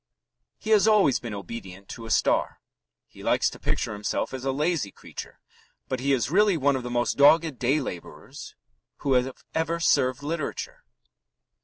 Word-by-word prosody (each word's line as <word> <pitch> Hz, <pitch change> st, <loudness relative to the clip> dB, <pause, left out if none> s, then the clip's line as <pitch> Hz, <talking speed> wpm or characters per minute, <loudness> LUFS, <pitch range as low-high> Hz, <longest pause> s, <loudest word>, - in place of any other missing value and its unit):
He 220 Hz, -, -5 dB
has 215 Hz, 0 st, +5 dB
always 205 Hz, -, +4 dB
been 115 Hz, -3 st, -6 dB
obedient 100 Hz, -1 st, -8 dB
to 115 Hz, -1 st, -8 dB
a -, -, -9 dB
star. -, -, +1 dB, 0.5 s
He -, -, -15 dB
likes -, -, +2 dB
to -, -, -11 dB
picture -, -, -2 dB
himself 105 Hz, +4 st, -3 dB
as 130 Hz, -1 st, -5 dB
a 135 Hz, -, 0 dB
lazy 150 Hz, -, 0 dB
creature, -, -, -10 dB, 0.5 s
but 130 Hz, -, -2 dB
he 140 Hz, +2 st, 0 dB
is 125 Hz, -1 st, +1 dB
really 200 Hz, 0 st, +4 dB
one 140 Hz, -1 st, +2 dB
of 130 Hz, -, -2 dB
the 125 Hz, -, -6 dB
most 120 Hz, 0 st, 0 dB
dogged 150 Hz, -1 st, +5 dB
day 130 Hz, +5 st, +2 dB
labourers 90 Hz, -, -8 dB, 0.5 s
who 135 Hz, -, +3 dB
have 125 Hz, +1 st, +2 dB, 0.2 s
ever 165 Hz, +1 st, -1 dB
served 130 Hz, -5 st, +2 dB
literature. 155 Hz, 0 st, -4 dB
135 Hz, 170 wpm, -26 LUFS, 120-160 Hz, 0.5 s, has